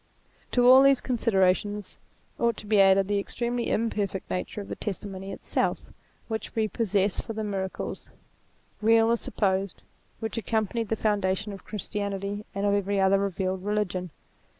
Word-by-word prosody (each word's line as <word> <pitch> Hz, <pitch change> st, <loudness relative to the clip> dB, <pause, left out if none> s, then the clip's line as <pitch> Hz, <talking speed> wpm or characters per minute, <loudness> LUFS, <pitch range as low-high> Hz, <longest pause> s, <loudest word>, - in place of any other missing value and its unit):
To 245 Hz, -1 st, +4 dB
all 260 Hz, +1 st, +9 dB
these 275 Hz, -1 st, +5 dB
considerations 205 Hz, -4 st, 0 dB, 0.4 s
ought 235 Hz, -2 st, +1 dB
to -, -, -9 dB
be 205 Hz, -1 st, +4 dB
added 195 Hz, 0 st, +5 dB
the 205 Hz, 0 st, +1 dB
extremely 240 Hz, +3 st, -2 dB
imperfect 205 Hz, -4 st, -1 dB
nature 185 Hz, +3 st, -3 dB
of 200 Hz, -, -6 dB
the -, -, -5 dB
testimony 195 Hz, -1 st, -5 dB
itself -, -, -1 dB, 0.4 s
which 220 Hz, -1 st, -5 dB
we 220 Hz, -1 st, +2 dB
possess 205 Hz, -3 st, 0 dB
for 225 Hz, -, -6 dB
the 220 Hz, 0 st, -3 dB
miracles, 195 Hz, -2 st, -4 dB, 0.7 s
real 225 Hz, +1 st, +5 dB
or -, -, +4 dB
supposed, 195 Hz, -4 st, -1 dB, 0.4 s
which 225 Hz, 0 st, -3 dB
accompanied 220 Hz, +1 st, -1 dB
the 225 Hz, -, +1 dB
foundation 205 Hz, -1 st, 0 dB
of 195 Hz, -, -11 dB
Christianity 205 Hz, -1 st, -4 dB
and 200 Hz, +1 st, -1 dB
of 200 Hz, -, +3 dB
every 200 Hz, 0 st, +1 dB
other 195 Hz, +1 st, +4 dB
revealed 190 Hz, -1 st, -2 dB
religion. 195 Hz, -3 st, -1 dB
205 Hz, 150 wpm, -27 LUFS, 195-220 Hz, 0.7 s, all